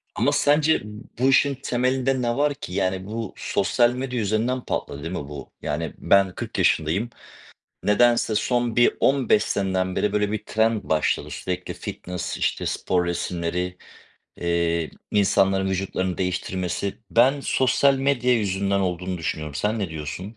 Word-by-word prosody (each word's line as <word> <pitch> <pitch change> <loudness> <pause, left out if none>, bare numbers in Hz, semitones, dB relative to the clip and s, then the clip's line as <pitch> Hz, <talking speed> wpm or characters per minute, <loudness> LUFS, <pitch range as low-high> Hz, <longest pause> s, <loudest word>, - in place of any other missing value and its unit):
Ama - - +2
sence 150 +2 +3 0.4
bu 130 +2 +4
işin 140 +1 +4
temelinde 130 0 0
ne 120 0 0
var 145 0 +2
ki? 90 - -8
Yani, 95 -1 -1
bu 110 0 -5
sosyal 120 +4 +2
medya 125 -1 -3
yüzünden 110 +5 0
patladı 70 - -3
değil 80 - -4
mi 90 - -3
bu? 70 -2 -9
Yani 75 +2 -3
ben 100 -2 +3
40 - - -5
yaşındayım. 85 +9 +1 0.7
Nedense 115 +1 +3
son 120 +1 0
bir 120 - +4
15 130 -6 +3
seneden 95 -2 -1
beri, 105 - +1
böyle, 105 -1 +1
bir 105 -1 -3
trend 110 0 +1
başladı. 80 -1 0
Sürekli 90 0 -4
fitness, 90 0 -5
işte, - - -1
spor 90 -1 0
resimleri, 85 +1 -2 0.6
eee, 85 -2 0 0.2
insanların 95 -1 +2
vücutlarını 95 -1 -2
değiştirmesi. 90 +1 -2
Ben 130 +5 +4
sosyal 135 +1 +3
medya 135 -2 +2
yüzünden 100 -2 0
olduğunu 90 0 -2
düşünüyorum. 75 -2 -4
Sen 105 +8 -1
ne 100 -4 -2
diyorsun? 85 +7 -6
100 Hz, 145 wpm, -24 LUFS, 90-120 Hz, 0.7 s, bu